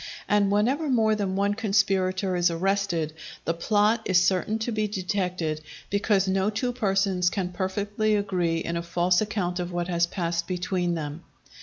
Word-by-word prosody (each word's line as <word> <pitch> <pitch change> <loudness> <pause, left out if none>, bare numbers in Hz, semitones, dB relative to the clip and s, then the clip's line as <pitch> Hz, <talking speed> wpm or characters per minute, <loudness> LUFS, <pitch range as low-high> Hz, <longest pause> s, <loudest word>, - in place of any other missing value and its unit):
And 205 -1 +3
whenever 255 +10 +1
more 220 -4 +3
than 200 -3 -1
one 200 +1 +1
conspirator 195 -3 +1
is 175 0 +3
arrested, 175 -2 0 0.3
the 165 - +1
plot 210 +6 +2
is 185 -2 +4
certain 185 +4 +1
to 225 +2 -3
be 215 -1 0
detected, 180 -5 -2 0.3
because 200 -1 +2
no 190 +1 +1
two 225 +4 -1
persons 195 -6 +1
can 190 -2 -2
perfectly 205 +3 -1
agree 180 -5 0
in 170 +1 -3
a 170 - -1
false 175 +2 +1
account 195 -4 -2
of 180 0 -3
what 175 0 -2
has 170 -1 +2
passed 170 -2 -2
between 180 -1 -1
them. 150 0 -5
190 Hz, 165 wpm, -26 LUFS, 175-210 Hz, 0.3 s, is